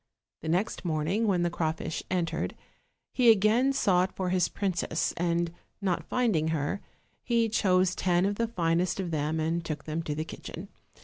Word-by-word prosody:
The 160 Hz, -, -4 dB
next 180 Hz, +6 st, 0 dB
morning, 170 Hz, +7 st, 0 dB
when 180 Hz, -4 st, +2 dB
the 175 Hz, -, 0 dB
crawfish 160 Hz, -1 st, -2 dB
entered, 180 Hz, -3 st, -1 dB, 0.6 s
he 245 Hz, -3 st, +5 dB
again 225 Hz, +5 st, +5 dB
sought 190 Hz, -8 st, +2 dB
for 185 Hz, -1 st, -1 dB
his 180 Hz, -1 st, +2 dB
princess, 175 Hz, -4 st, -1 dB
and, 170 Hz, 0 st, 0 dB, 0.3 s
not 190 Hz, -4 st, 0 dB
finding 215 Hz, -11 st, +2 dB
her, 160 Hz, +4 st, -1 dB, 0.4 s
he 235 Hz, -2 st, +2 dB
chose 185 Hz, -4 st, +2 dB
ten 180 Hz, -1 st, +2 dB
of 200 Hz, -, +1 dB
the 230 Hz, -, +1 dB
finest 175 Hz, -3 st, 0 dB
of 180 Hz, -3 st, -2 dB
them 155 Hz, +1 st, -1 dB
and 165 Hz, +2 st, 0 dB
took 155 Hz, -2 st, -4 dB
them 155 Hz, +1 st, -3 dB
to 150 Hz, -2 st, -3 dB
the 155 Hz, +1 st, -3 dB
kitchen. -, -, -8 dB
180 Hz, 170 wpm, -28 LUFS, 165-200 Hz, 0.6 s, he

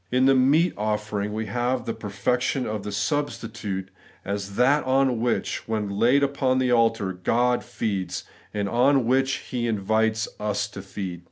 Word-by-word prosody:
In 130 Hz, +1 st, +3 dB
the 135 Hz, -, +6 dB
meat 145 Hz, +7 st, +4 dB
offering 105 Hz, -1 st, -2 dB
we 110 Hz, +1 st, -3 dB
have 120 Hz, +4 st, -1 dB
the 115 Hz, -, -2 dB
perfection 125 Hz, +4 st, -1 dB
of 105 Hz, -1 st, -3 dB
the 105 Hz, +1 st, -5 dB
substitute, 105 Hz, -4 st, -3 dB, 0.3 s
as 100 Hz, 0 st, -4 dB
that 135 Hz, +6 st, +4 dB
on 130 Hz, -2 st, +2 dB
which, 120 Hz, -, -1 dB
when 110 Hz, -2 st, -1 dB
laid 120 Hz, +8 st, +3 dB
upon 135 Hz, -2 st, +1 dB
the 130 Hz, -1 st, +2 dB
altar, 115 Hz, -5 st, +2 dB
God 120 Hz, +7 st, +1 dB
feeds, 100 Hz, -7 st, -3 dB, 0.3 s
and 105 Hz, -1 st, -2 dB
on 125 Hz, +4 st, +3 dB
which 130 Hz, +2 st, +2 dB, 0.2 s
He 120 Hz, -2 st, -1 dB
invites 110 Hz, +1 st, +1 dB
us 105 Hz, 0 st, -1 dB
to 100 Hz, -1 st, -8 dB
feed. 95 Hz, -2 st, -6 dB
115 Hz, 160 wpm, -25 LUFS, 105-130 Hz, 0.3 s, the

